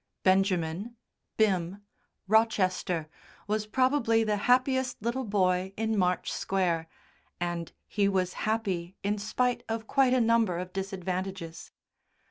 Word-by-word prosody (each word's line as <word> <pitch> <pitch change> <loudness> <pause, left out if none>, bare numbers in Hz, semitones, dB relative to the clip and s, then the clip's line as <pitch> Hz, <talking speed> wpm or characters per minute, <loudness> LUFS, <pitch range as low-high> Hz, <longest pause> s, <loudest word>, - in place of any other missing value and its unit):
Benjamin 190 +2 +1 0.4
(Bim) 195 -2 +1 0.4
Rochester 185 -6 +2 0.4
was 215 +1 -1
probably 235 -2 +2
the 215 -1 +1
happiest 255 0 +2
little 235 +4 -2
boy 190 -2 +1
in 220 0 0
March 180 -2 +1
Square, 175 -4 0 0.5
and 175 -1 -3 0.2
he 200 -2 +1
was 185 -2 0 0.2
happy 190 -5 -1
in 205 +1 0
spite 245 +3 0
of 225 0 -2
quite 255 +1 +3
a - - +3
number 230 -6 +3
of 180 +1 -6
disadvantages. 190 -2 -4
200 Hz, 115 wpm, -29 LUFS, 180-225 Hz, 0.5 s, quite